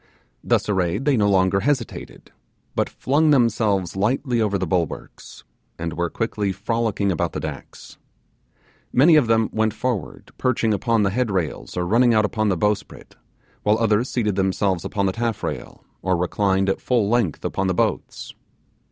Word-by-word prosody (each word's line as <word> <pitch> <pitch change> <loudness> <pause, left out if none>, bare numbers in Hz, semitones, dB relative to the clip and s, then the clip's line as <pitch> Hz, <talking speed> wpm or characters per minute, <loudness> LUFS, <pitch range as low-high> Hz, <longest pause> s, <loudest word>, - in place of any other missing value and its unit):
Thus - - +1
arrayed 95 - 0
they 145 -2 +3
no 105 -3 +2
longer 95 0 +3
hesitated, 145 +6 -3 0.4
but - - 0
flung 150 +4 +1
themselves 110 - +2
lightly 120 +4 0
over 100 -2 +1
the 95 - -2
bulwarks, 85 -2 -4 0.3
and 85 -1 -4
were 85 +1 -1
quickly 105 -2 -2
frolicking 105 0 -1
about 85 - -1
the - - -3
decks. - - -8 0.9
Many 155 +6 +5
of 145 -6 +4
them 115 -1 +3
went 110 -1 0
forward, 125 -9 -4
perching 120 -3 +1
upon 115 +1 +1
the 95 - +1
headrails 95 - -2
or 90 - 0
running 115 +5 +3
out 110 -1 +4
upon 110 0 0
the 95 - +1
bowsprit, 105 +4 -2 0.5
while 105 +1 +2
others 115 +2 +1
seated 105 -4 0
themselves 95 -1 0
upon 100 -1 -1
the 95 - +1
taffrail, 115 -2 -4 0.2
or 95 -1 +1
reclined 95 +2 +1
at 95 - -1
full 120 -5 +1
length 115 -7 0
upon 95 - -1
the 95 - 0
boats. - - -2
105 Hz, 160 wpm, -22 LUFS, 95-115 Hz, 0.9 s, Many